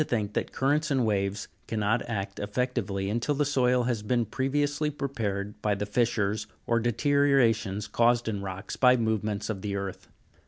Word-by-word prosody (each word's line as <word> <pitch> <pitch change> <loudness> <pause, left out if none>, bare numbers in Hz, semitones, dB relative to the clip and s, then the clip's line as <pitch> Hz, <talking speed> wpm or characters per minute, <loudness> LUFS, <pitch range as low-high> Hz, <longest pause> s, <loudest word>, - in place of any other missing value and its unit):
think 110 -7 -2
that - - -2
currents 150 +4 +1
and 135 -4 +2
waves 100 -1 -1 0.2
cannot 110 +1 +1
act 100 -3 -3
effectively 105 -3 -2
until 120 +8 0
the 145 +1 +1
soil 125 -3 +2
has 120 -3 -1
been 120 +2 +1
previously 145 +6 0
prepared 110 -9 -3
by 105 -1 +1
the 100 +1 -3
fissures 105 -1 0 0.2
or 115 0 +2
deteriorations 120 -4 +2
caused 120 0 +2
in 105 -3 -2
rocks 95 0 -5
by 125 -1 +5
movements 110 -2 -1
of 105 -4 -3
the 100 0 -3
earth. 100 -1 -5
115 Hz, 160 wpm, -28 LUFS, 100-125 Hz, 0.2 s, by